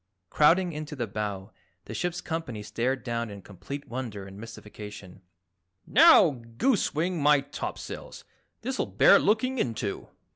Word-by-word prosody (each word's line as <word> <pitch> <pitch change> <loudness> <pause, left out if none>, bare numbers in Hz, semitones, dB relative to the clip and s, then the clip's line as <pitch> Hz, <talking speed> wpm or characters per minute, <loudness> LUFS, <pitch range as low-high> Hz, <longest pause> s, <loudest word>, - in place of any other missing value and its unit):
Crowding 175 +3 +4
into 150 0 -6
the 120 -4 -2
bow, 100 -2 -5 0.3
the - - -7
ship's 175 -1 -2
company 160 -10 -4
stared 125 +4 -2
down 115 -2 -2
in 100 -1 -8
complete 140 +9 -8
wonder 115 -6 -5
and 95 0 -11
mystification. 105 -4 -10 0.6
"Now, 200 - +6 0.2
goosewing 180 - +1
my 145 -1 +5
topsails, 140 +1 -7 0.4
this'll 260 +2 -2
bear - - +6
looking 250 +4 +1
into!" 110 - -2
130 Hz, 125 wpm, -27 LUFS, 105-170 Hz, 0.6 s, Now